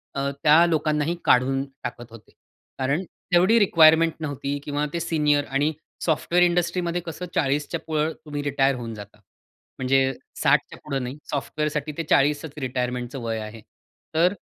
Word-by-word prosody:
अ, 140 Hz, 0 st, -1 dB
त्या 155 Hz, +3 st, +7 dB
लोकांनाही 155 Hz, 0 st, 0 dB
काढून 135 Hz, +2 st, +3 dB, 0.2 s
टाकत 120 Hz, -1 st, -6 dB
होते. 115 Hz, -2 st, -14 dB, 0.5 s
कारण 140 Hz, +7 st, 0 dB, 0.3 s
तेवढी 185 Hz, +6 st, +5 dB
रिक्वायरमेंट 165 Hz, -4 st, +5 dB
नव्हती 145 Hz, -2 st, -3 dB
किंवा 145 Hz, +1 st, -1 dB
ते 170 Hz, -, -1 dB
सीनियर 150 Hz, -3 st, +1 dB
आणि 145 Hz, +3 st, 0 dB, 0.3 s
सॉफ्टवेअर 175 Hz, +2 st, +2 dB
इंडस्ट्रीमध्ये 175 Hz, 0 st, 0 dB
कसं 170 Hz, +2 st, -6 dB
40च्या 145 Hz, 0 st, 0 dB
पुढं 155 Hz, 0 st, 0 dB
तुम्ही 145 Hz, -1 st, -4 dB
रिटायर 135 Hz, -1 st, +2 dB
होऊन 115 Hz, -2 st, -6 dB
जाता. 105 Hz, 0 st, -11 dB, 0.6 s
म्हणजे 135 Hz, +1 st, +2 dB, 0.3 s
60च्या -, -, +2 dB
पुढे 140 Hz, -2 st, -2 dB
नाही. 125 Hz, +3 st, -5 dB
सॉफ्टवेअरसाठी 150 Hz, +1 st, -2 dB
ते 165 Hz, -, -1 dB
40चं 145 Hz, +1 st, +2 dB
रिटायरमेंटच 125 Hz, -1 st, -3 dB
वय 115 Hz, -3 st, -3 dB
आहे. 110 Hz, +1 st, -8 dB, 0.5 s
तर 175 Hz, +4 st, +4 dB
145 Hz, 140 wpm, -24 LUFS, 135-160 Hz, 0.6 s, त्या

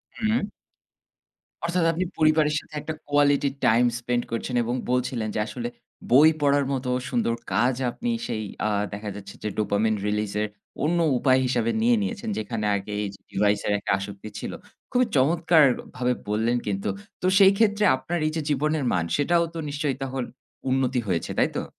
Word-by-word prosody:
হুম। 220 Hz, -1 st, 0 dB, 1.2 s
অর্থাৎ 175 Hz, +1 st, +1 dB
আপনি 175 Hz, +3 st, -1 dB
পরিবারের 155 Hz, -1 st, +3 dB
সাথে -, -, -19 dB
একটা 160 Hz, -, -4 dB, 0.2 s
quality 145 Hz, -1 st, +3 dB, 0.2 s
time 120 Hz, +2 st, +5 dB
spend 120 Hz, 0 st, -1 dB
করছেন 115 Hz, +2 st, -3 dB
এবং 120 Hz, +2 st, -2 dB, 0.2 s
বলছিলেন 125 Hz, -3 st, 0 dB
যে -, -, 0 dB
আসলে 120 Hz, +1 st, -4 dB, 0.4 s
বই 145 Hz, +5 st, +8 dB
পড়ার 145 Hz, -1 st, +3 dB
মতো 130 Hz, -1 st, -2 dB, 0.2 s
সুন্দর 115 Hz, -2 st, 0 dB, 0.2 s
কাজ 120 Hz, +3 st, +3 dB, 0.2 s
আপনি 240 Hz, -, -4 dB, 0.2 s
সেই 110 Hz, -1 st, -3 dB, 0.2 s
আ -, -, +1 dB, 0.2 s
দেখা 105 Hz, 0 st, -5 dB
যাচ্ছে 100 Hz, -1 st, -9 dB
যে 105 Hz, -, -1 dB
dopamine 105 Hz, +1 st, +1 dB
release 105 Hz, -1 st, -1 dB
এর 105 Hz, -, 0 dB, 0.4 s
অন্য 170 Hz, +3 st, +2 dB, 0.2 s
উপায় 130 Hz, +1 st, +3 dB
হিসাবে 120 Hz, -2 st, +1 dB
নিয়ে 240 Hz, +1 st, +4 dB
নিয়েছেন। 210 Hz, +2 st, -3 dB
যেখানে 110 Hz, 0 st, -3 dB
আগে 100 Hz, +1 st, -5 dB
এইযে 100 Hz, -1 st, -6 dB
ডিভাইসের 105 Hz, +1 st, +1 dB
একটা -, -, -3 dB
আসক্তি 100 Hz, +1 st, -7 dB
ছিল। -, -, -5 dB, 0.4 s
খুবই 250 Hz, 0 st, +3 dB
চমৎকারভাবে 140 Hz, -4 st, +3 dB, 0.2 s
বললেন 110 Hz, +3 st, +1 dB
কিন্তু। 100 Hz, 0 st, -1 dB, 0.3 s
তো 185 Hz, -, +1 dB
সেইক্ষেত্রে 205 Hz, +2 st, +5 dB
আপনার 130 Hz, +7 st, -3 dB
এইযে 155 Hz, +1 st, -2 dB
জীবনের 150 Hz, +1 st, +1 dB
মান, 85 Hz, -2 st, +1 dB
সেটাও 170 Hz, +4 st, +2 dB
তো -, -, -6 dB
নিশ্চয়ই 145 Hz, -1 st, -1 dB
তখন 135 Hz, -1 st, -3 dB, 0.5 s
উন্নতি 130 Hz, -1 st, +1 dB
হয়েছে, 90 Hz, -3 st, -1 dB
তাই -, -, +3 dB
তো? -, -, -3 dB
130 Hz, 160 wpm, -25 LUFS, 110-155 Hz, 1.2 s, বই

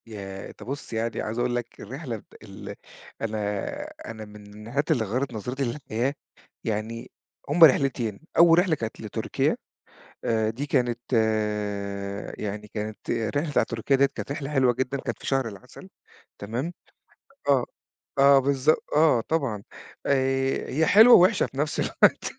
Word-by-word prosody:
ياه! 95 Hz, -3 st, -7 dB
أنت -, -, -12 dB
بُصّ، 140 Hz, -1 st, -6 dB
يعني 115 Hz, +1 st, -2 dB
عايز 110 Hz, +2 st, -3 dB
اقول 120 Hz, 0 st, 0 dB
لك 120 Hz, -1 st, -5 dB
الرحلة 130 Hz, +1 st, -5 dB
بت -, -, -19 dB
ال 100 Hz, -2 st, -9 dB, 0.5 s
أنا 105 Hz, -, -2 dB, 0.4 s
أنا 110 Hz, -1 st, -7 dB
من 105 Hz, 0 st, -13 dB
الرحلات 145 Hz, +7 st, -1 dB
اللي 125 Hz, -8 st, +2 dB
غيّرت 125 Hz, +5 st, -2 dB
نظرتي 125 Hz, +5 st, -3 dB
للحياة، 125 Hz, 0 st, -2 dB, 0.5 s
يعني 110 Hz, +1 st, -3 dB, 0.4 s
هُم 165 Hz, +4 st, +5 dB
رحلتين، 130 Hz, -7 st, +4 dB, 0.2 s
أول 170 Hz, 0 st, +7 dB
رحلة 175 Hz, -3 st, +2 dB
كانت 115 Hz, -6 st, -6 dB
لتركيا -, -, -1 dB, 0.7 s
آآ، 110 Hz, -1 st, +1 dB
دي 125 Hz, +6 st, -4 dB
كانت 120 Hz, -4 st, +1 dB, 1.4 s
يعني 105 Hz, 0 st, -5 dB
كانت 105 Hz, 0 st, -5 dB
الرحلة 145 Hz, +7 st, -1 dB
بتاعة -, -, +3 dB
تركيا 115 Hz, +4 st, 0 dB
دِيَّة 135 Hz, +1 st, +5 dB
كانت -, -, -5 dB
رحلة 140 Hz, -1 st, -4 dB
حلوة 135 Hz, -4 st, +3 dB
جدًا، 130 Hz, +2 st, -2 dB
كانت 120 Hz, -4 st, -4 dB
في -, -, -11 dB
شهر 135 Hz, -3 st, +1 dB
العسل 100 Hz, -4 st, -11 dB, 0.5 s
تمام، 120 Hz, +11 st, -3 dB, 0.8 s
آه، 135 Hz, -3 st, +4 dB, 0.5 s
آه 140 Hz, 0 st, +7 dB
بالضبط، 140 Hz, +2 st, +2 dB
آه 150 Hz, -6 st, +5 dB
طبعًا، 125 Hz, -8 st, -2 dB, 0.4 s
آآ، 135 Hz, -1 st, +1 dB
هي 155 Hz, +5 st, +2 dB
حلوة 220 Hz, +8 st, +8 dB
ووحشة 185 Hz, +3 st, +5 dB
في 135 Hz, -, -10 dB
نفس 150 Hz, +2 st, -1 dB
الوقت -, -, +2 dB
125 Hz, 145 wpm, -26 LUFS, 110-140 Hz, 1.4 s, حلوة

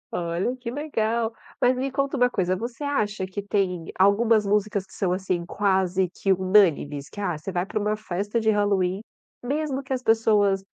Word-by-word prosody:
Olha 175 Hz, +8 st, -1 dB
que 245 Hz, -2 st, -6 dB
legal! 235 Hz, -5 st, -1 dB, 0.3 s
Mas 250 Hz, +1 st, +3 dB
me 265 Hz, +2 st, -2 dB
conta 275 Hz, +1 st, -1 dB
uma 250 Hz, -1 st, +4 dB
coisa. 185 Hz, -5 st, 0 dB
Você 235 Hz, +7 st, -6 dB
acha 215 Hz, -9 st, -1 dB
que 190 Hz, +2 st, -5 dB
tem 190 Hz, -4 st, -1 dB
algumas 210 Hz, +3 st, +4 dB
músicas 205 Hz, -1 st, 0 dB
que -, -, -20 dB
são, 190 Hz, -3 st, -1 dB
assim, 185 Hz, -1 st, -1 dB
quase 190 Hz, -1 st, +1 dB
que 195 Hz, +2 st, -2 dB
unânimes? 175 Hz, -7 st, +2 dB
Que, 205 Hz, -, -10 dB
ah, 185 Hz, -4 st, -1 dB
você 155 Hz, +6 st, -6 dB
vai 180 Hz, 0 st, -1 dB
pra 215 Hz, -, -3 dB
uma 210 Hz, +1 st, 0 dB
festa 205 Hz, +2 st, -2 dB
de 220 Hz, -1 st, +2 dB
Halloween, 200 Hz, -2 st, +1 dB, 0.4 s
mesmo 280 Hz, +1 st, -2 dB
que 265 Hz, -, -14 dB
as 255 Hz, -1 st, -1 dB
pessoas 210 Hz, -4 st, +3 dB
205 Hz, 185 wpm, -25 LUFS, 185-235 Hz, 0.4 s, uma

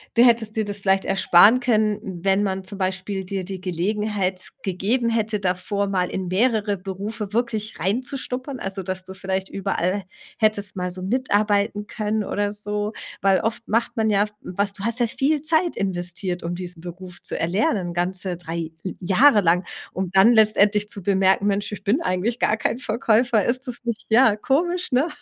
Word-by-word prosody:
du 240 Hz, +2 st, +7 dB
hättest 225 Hz, -2 st, +3 dB
dir 220 Hz, -1 st, 0 dB
das 205 Hz, 0 st, -5 dB
vielleicht 195 Hz, 0 st, +2 dB
ersparen 195 Hz, +4 st, +6 dB
können, 215 Hz, -4 st, +1 dB, 0.2 s
wenn 195 Hz, +1 st, +3 dB
man 190 Hz, -1 st, -2 dB
zum 195 Hz, +1 st, -8 dB
Beispiel 190 Hz, +1 st, -2 dB
dir 190 Hz, 0 st, -3 dB
die 190 Hz, 0 st, -6 dB
Gelegenheit 190 Hz, +1 st, -1 dB, 0.2 s
gegeben 220 Hz, +6 st, 0 dB
hätte, 215 Hz, -2 st, 0 dB
davor 195 Hz, +2 st, -1 dB
mal 185 Hz, -2 st, 0 dB
in 190 Hz, -1 st, -3 dB
mehrere 210 Hz, 0 st, +1 dB
Berufe 200 Hz, +3 st, -5 dB
wirklich 220 Hz, -7 st, -2 dB
reinzuschnuppern? 255 Hz, -, -3 dB
Also, 195 Hz, 0 st, -4 dB
dass 185 Hz, 0 st, -4 dB
du 190 Hz, -, -8 dB
vielleicht 190 Hz, 0 st, -3 dB
überall, 195 Hz, 0 st, -1 dB, 0.4 s
hättest 205 Hz, -2 st, +1 dB
mal 180 Hz, -1 st, -2 dB
so 185 Hz, 0 st, -7 dB
mitarbeiten 205 Hz, -2 st, +1 dB
können 215 Hz, -1 st, -2 dB
oder 205 Hz, +1 st, -1 dB
so. 210 Hz, +1 st, -2 dB, 0.3 s
Weil 195 Hz, -1 st, +3 dB
oft 230 Hz, +1 st, -3 dB
macht 230 Hz, +2 st, 0 dB
man 220 Hz, -1 st, +2 dB
ja, 205 Hz, 0 st, +3 dB, 0.2 s
was 200 Hz, +2 st, -2 dB
du 195 Hz, -, -8 dB
hast 230 Hz, +2 st, 0 dB
ja 240 Hz, -, +3 dB
viel 285 Hz, +5 st, 0 dB
Zeit 325 Hz, +2 st, +1 dB
investiert, 180 Hz, -1 st, -2 dB
um 170 Hz, +1 st, -3 dB
diesen 175 Hz, -2 st, -7 dB
Beruf 180 Hz, 0 st, -9 dB
zu -, -, -4 dB
erlernen 180 Hz, 0 st, 0 dB
ganze 180 Hz, +1 st, -1 dB
3 165 Hz, -1 st, -5 dB
l 185 Hz, -, -4 dB
Jahre 205 Hz, +5 st, +5 dB
lang, 175 Hz, +1 st, +3 dB, 0.3 s
um 185 Hz, -1 st, -2 dB
dann 195 Hz, +5 st, +6 dB
letztendlich 210 Hz, -1 st, +4 dB
zu 200 Hz, -, -6 dB
bemerken: 195 Hz, 0 st, +3 dB
„Mensch, 205 Hz, +1 st, 0 dB
ich 205 Hz, -1 st, -7 dB
bin 245 Hz, +11 st, +1 dB
eigentlich 210 Hz, -, -1 dB
gar 215 Hz, -, +2 dB
kein 225 Hz, -, -1 dB
Verkäufer.“ 230 Hz, -2 st, +2 dB
Ist 255 Hz, +2 st, -1 dB
das 245 Hz, -, -3 dB
nicht, 235 Hz, -2 st, -4 dB
ja, 225 Hz, -1 st, +5 dB
komisch, 345 Hz, +11 st, 0 dB
ne? 260 Hz, +6 st, +3 dB
205 Hz, 180 wpm, -23 LUFS, 190-225 Hz, 0.4 s, du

